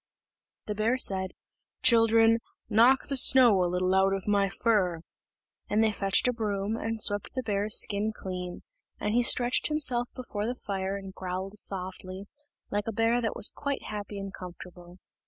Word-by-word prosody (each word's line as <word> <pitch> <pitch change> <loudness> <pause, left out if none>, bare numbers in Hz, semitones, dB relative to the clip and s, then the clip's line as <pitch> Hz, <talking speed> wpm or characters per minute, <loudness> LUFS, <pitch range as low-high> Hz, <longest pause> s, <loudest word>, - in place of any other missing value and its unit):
The 210 - -3
bear 220 +4 0
said, 190 -6 +1 0.5
"Children, 230 -2 +4 0.3
knock 240 +5 +4
the 275 - -3
snow 245 -7 +6
a 175 - 0
little 185 +1 0
out 190 0 +2
of 195 - -7
my 200 -1 +2
fur;" 190 -6 0 0.7
and 215 +2 +2
they 220 - +2
fetched 195 +2 0
a 250 - +1
broom, 210 -2 -3
and 225 -1 -4
swept 205 -2 +1
the 255 - -3
bear's 210 -1 +2
skin 205 +1 +1
clean; 180 -3 -7 0.4
and 210 - -2
he 240 - +3
stretched 245 0 +2
himself 260 -6 +1
before 220 -4 -5
the 245 - -3
fire 195 -1 -3
and 195 -1 -10
growled 190 +2 -6
softly, 185 0 -2 0.5
like 205 +1 -2
a - - -1
bear 225 +2 +1
that 225 - -3
was - - +3
quite 280 -1 -4
happy 205 -1 -7
and 195 0 -7
comfortable. 180 0 -11
205 Hz, 170 wpm, -27 LUFS, 190-230 Hz, 0.7 s, snow